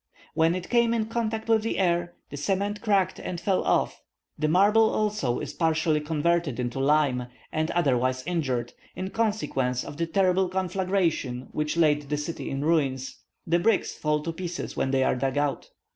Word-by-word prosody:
When 165 +2 +3
it 180 -1 -6
came 235 -1 +3
in 220 -2 0
contact 225 -1 -2
with 225 -1 +4
the 225 - -2
air, 175 -2 +1 0.2
the - - -5
cement 200 +7 -1
cracked 195 -4 +1
and 175 - -5
fell 190 +1 +1
off. - - +1 0.4
The 155 - +1
marble 205 +7 +5
also 210 - 0
is - - -5
partially 160 -2 +1
converted 160 -2 0
into 125 +1 -2
lime, 135 -3 +2 0.3
or 155 0 +1
otherwise 130 -5 +1
injured, 130 -9 -1 0.2
in 190 +1 -4
consequence 205 - 0
of 145 - -8
the 165 0 -1
terrible 185 +1 +2
conflagration 185 -8 -1
which 150 +2 -2
laid 150 -3 +2
the 150 - 0
city 150 +3 -4
in 135 +2 -3
ruins. 135 -5 0 0.3
The 170 +1 +2
bricks 210 +3 +1
fall 150 -1 -1
to 165 - -3
pieces 175 0 -5
when 135 - 0
they 130 0 +2
are - - +2
dug 135 +2 -1
out. 145 -1 -1
165 Hz, 175 wpm, -26 LUFS, 145-190 Hz, 0.4 s, marble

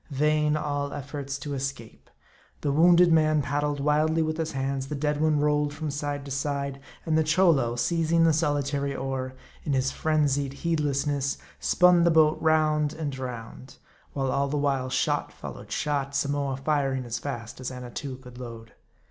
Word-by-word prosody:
Vain 150 +1 +2
all 145 -1 -2
efforts 140 0 -5
to 145 0 -5
escape. 135 -4 -6 0.5
The 145 - 0
wounded 170 +3 +6
man 155 -2 +3
paddled 145 +1 -1
wildly 155 +3 +2
with 155 0 -2
his 160 -2 -2
hands; 135 0 -2
the 150 - -4
dead 150 +1 -1
one 155 -1 +3
rolled 150 0 +1
from 155 -1 -3
side 145 -1 -3
to 140 - -8
side; 140 0 -2 0.3
and 160 - +1
the 160 - +4
Cholo, 155 -7 +3
seizing 165 +5 +2
tne 165 - +5
solitary 145 -2 0
oar, 130 -1 -3 0.3
in 150 - -1
his 135 0 +1
frenzied 145 -3 0
heedlessness, 145 -3 -1 0.2
spun 180 -1 +4
the 170 - +5
boat 160 -1 +4
round 155 -1 +2
and 150 -4 -4
round; 125 0 -7 0.4
while 135 -2 -1
all 140 0 +1
the 145 +2 -2
while 135 -3 0
shot - - 0
followed - - -9
shot, 140 -2 -1
Samoa 140 -1 0
firing 135 -2 0
as 120 0 -3
.fast 120 -2 -6
as 130 - -3
Annatoo 125 +1 -6
could 125 -1 -13
load. 115 -2 -9
145 Hz, 165 wpm, -26 LUFS, 135-155 Hz, 0.5 s, wounded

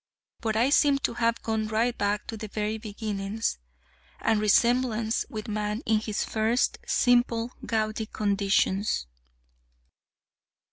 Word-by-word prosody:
But 220 -1 -1
I 240 +5 +3
seem 285 -1 +5
to 275 - -2
have 230 -1 0
gone 220 -1 -1
right 230 +3 +1
back 205 +1 -1
to 225 - -6
the 215 0 -6
very 215 +1 -2
beginnings, 210 - -3 0.6
and 220 -1 +1
resemblance 230 +1 +2
with 215 -2 -6
man 210 +2 -2
in 220 -1 +3
his 215 -1 -2
first, 225 +3 +1
simple, 240 -1 +2 0.2
gaudy 215 -1 -1
conditions. 200 - +1
220 Hz, 125 wpm, -27 LUFS, 210-230 Hz, 0.6 s, seem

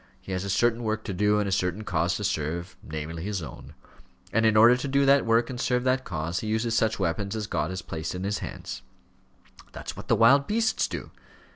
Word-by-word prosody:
He - - -10
has 95 0 -2
a 100 - -4
certain 120 +4 +2
work 110 -1 -2
to 100 - -4
do, 105 +3 +2
and 105 -1 0
a - - -2
certain 95 +2 0
cause 90 -2 0
to 105 - -4
serve 85 0 -2
namely, 80 +1 -6
his 100 -3 -3
own; 65 - -10 0.6
and 115 +1 +4
in 110 -1 +3
order 115 +3 +8
to 125 +3 -3
do 140 +1 +2
that 140 -2 +4
work, 115 +1 +3
and 125 -2 -5
serve 125 -1 +1
that 130 0 +1
cause, 85 +1 -3
he 110 - -5
uses 110 +1 0
such 110 -1 +2
weapons 100 -1 -1
as 110 -1 -2
God 80 -5 -1
has 95 0 -5
placed 80 +1 -5
in 90 - -4
his 100 +1 -1
hands." - - -7 0.9
"That's - - -7
what - - -10
the - - +4
wild 140 +5 +5
beasts 220 +1 +1
do." - - -6
105 Hz, 230 wpm, -26 LUFS, 90-115 Hz, 0.9 s, order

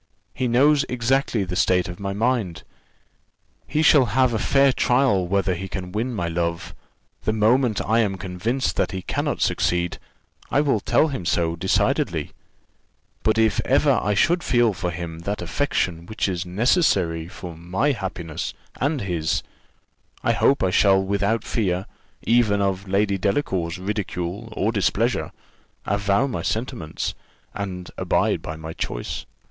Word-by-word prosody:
He 125 0 -1
knows 140 +5 +4
exactly 125 -2 +1
the 90 -1 -4
state 90 -1 +2
of 90 -1 -8
my 100 -1 -3
mind. 110 -4 -1 1.0
He 155 - +1
shall 145 -4 +6
have 130 +1 +2
a 110 - 0
fair 135 +3 +4
trial 125 -10 +2
whether 95 0 +1
he 95 +2 -5
can 90 -1 -6
win 115 +6 -2
my 90 -8 -2
love; 85 0 -2 0.5
the - - 0
moment 110 +1 +2
I 110 +2 +3
am 100 -4 +1
convinced 95 +8 -2
that - - 0
he 95 -1 -4
cannot - - -2
succeed, 90 0 0 0.5
I 140 - +2
will 140 -7 +2
tell 155 +9 +2
him 130 -10 -4
so 85 -1 0
decidedly: 95 +3 0 0.9
but 110 0 +1
if 110 -1 +3
ever - - +3
I 105 +1 0
should 175 - +3
feel 120 -8 +2
for 90 -1 -3
him 85 -1 -6
that 100 +5 -3
affection 85 -3 -1
which 110 -1 -1
is 90 -2 -3
necessary 90 - +2
for 90 -1 -9
my 90 - 0
happiness 95 - -4 0.2
and 145 0 0
his, 85 -5 -1 0.8
I - - +3
hope 140 - +3
I 95 - +2
shall 95 -1 +5
without 100 +3 0
fear, 95 -4 -1 0.4
even 115 -4 +3
of 95 -1 -1
Lady 100 0 +1
Delacour's 95 - -1
ridicule 100 +1 -4
or 110 +1 0
displeasure, 115 +3 0 0.5
avow 100 +4 +1
my 135 - -3
sentiments, 110 -9 -3 0.4
and 90 -3 -5
abide - - +1
by 80 - -6
my 80 +1 -7
choice." - - -4
100 Hz, 150 wpm, -23 LUFS, 90-120 Hz, 1.0 s, shall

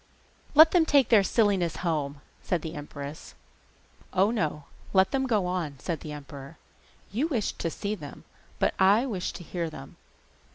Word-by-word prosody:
'Let 315 +2 +9
them 350 -3 +5
take 285 -6 +3
their 220 -4 +7
silliness 195 -5 +1
home,' 145 -4 -1 0.2
said 175 -4 -1
the 160 - -5
empress. 145 0 -8 0.8
'Oh, 195 +3 +3
no, 155 -9 -2 0.3
let 190 -1 +4
them 265 -1 0
go 215 -6 +1
on,' 175 -6 -3
said 160 +4 -4
the 155 - -8
emperor. 145 0 -9 0.5
'You 250 +11 0
wished 245 -10 -2
to 165 - -1
see 200 +5 -3
them, 150 -9 -9 0.3
but - - +1
I 200 +6 +5
wish 200 -9 -3
to 175 - -9
hear 170 -1 -3
them. 155 - -11
180 Hz, 165 wpm, -27 LUFS, 155-215 Hz, 0.8 s, Let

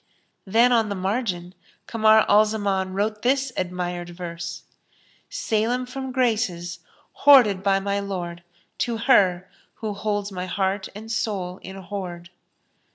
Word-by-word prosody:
Then 230 +5 +4
on 225 -3 +3
the 200 - -2
margin 190 -2 -2 0.3
Kamar 220 -1 +4
al 210 +1 +6
Zaman 200 -3 -1
wrote 210 +1 -1
this 265 +1 +1
admired 175 -1 -3
verse, 170 -1 -6 0.7
"Salem 245 - 0
from 265 +1 -6
graces 215 -9 0 0.3
hoarded 240 -10 +6
by 195 0 +2
my 200 +1 -1
Lord 175 -4 -5 0.2
* - - -40
To 235 -2 0
her, 190 -7 +3 0.3
who 215 -2 -4
holds 205 0 -2
my 185 -1 -4
heart 190 +1 -1
and 220 +2 -8
soul 195 -5 -2
in 190 - -9
hoard!" 180 -2 -7
200 Hz, 135 wpm, -24 LUFS, 180-225 Hz, 0.7 s, al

